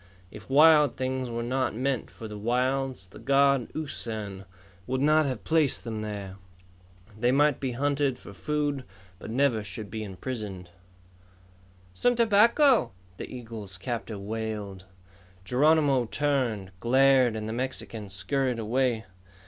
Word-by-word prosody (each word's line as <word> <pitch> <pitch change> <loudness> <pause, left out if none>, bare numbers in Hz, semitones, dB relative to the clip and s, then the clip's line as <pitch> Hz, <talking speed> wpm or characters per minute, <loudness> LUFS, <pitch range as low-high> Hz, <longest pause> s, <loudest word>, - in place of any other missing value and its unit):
If 105 +2 -12
wild 150 +1 +6
things 130 -1 -2
were 115 0 -3
not 130 0 -1
meant 130 0 -1
for 110 - -9
the 105 - -8
wilds, 125 0 -1
the 90 - -14
god, 140 -2 +3
Usan, 110 -10 -4 0.4
would 130 - -1
not 155 +2 +4
have 125 -7 -4
placed 155 +2 +3
them 110 -2 -4
there. 100 -3 -6 0.8
They 120 +3 +1
might 145 +1 +3
be 130 -3 -2
hunted 140 0 0
for 100 - -12
food 145 +3 -2 0.4
but - - -9
never 120 -2 +1
should 105 +1 -6
any - - -15
be 110 0 -4
imprisoned. 100 -3 -6 1.2
"Some 245 - +2
tobacco?" 235 - +4 0.2
the - - -7
eagle's 115 -6 -8
captor 115 0 -4
wailed. 105 -2 -5 0.6
Geronimo 140 +1 +3
turned, 120 -8 -1
glared, 130 0 +4
and 110 0 -4
the 110 - -3
Mexican 120 -4 -4
scurried 130 +6 -1
away. 115 0 0
125 Hz, 135 wpm, -27 LUFS, 110-140 Hz, 1.2 s, wild